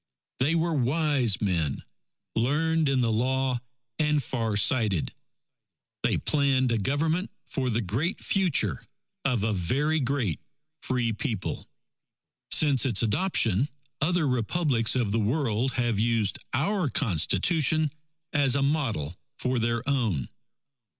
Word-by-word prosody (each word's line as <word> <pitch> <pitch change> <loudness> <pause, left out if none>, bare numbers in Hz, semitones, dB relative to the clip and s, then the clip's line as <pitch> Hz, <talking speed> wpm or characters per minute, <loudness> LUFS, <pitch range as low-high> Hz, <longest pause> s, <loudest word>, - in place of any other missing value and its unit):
They 145 +6 +2
were 165 0 +1
wise 135 -5 +1
men, 85 -9 -1 0.5
learned 155 +5 +1
in 135 -2 +2
the 115 -2 +1
Law, 130 +2 0 0.4
and 150 -2 +2
far 115 -4 -2
sighted. 105 - +1 0.9
They - - +1
planned 135 -4 +1
a 115 - +1
Government 160 - 0 0.2
for 130 -2 -2
the 115 0 0
great 130 - -1
future 155 - 0 0.4
of 125 -6 +1
a 110 0 +1
very 135 - 0
great 125 - -1 0.4
Free 125 -3 -1
People. 105 -1 -4 0.8
Since 140 -6 +4
its 115 -3 +2
adoption, 115 - +2 0.3
other 165 0 +2
Republics 125 -1 +1
of 120 -5 0
the 115 - +1
world 120 +1 0
have 120 -4 0
used 115 -2 +1
our 170 - 0
Constitution 140 - +2 0.4
as 140 -3 +3
a 140 - +1
model 115 - -1 0.2
for 125 -1 -1
their 115 +2 -1
own. 110 - 0
130 Hz, 125 wpm, -27 LUFS, 110-150 Hz, 0.9 s, Since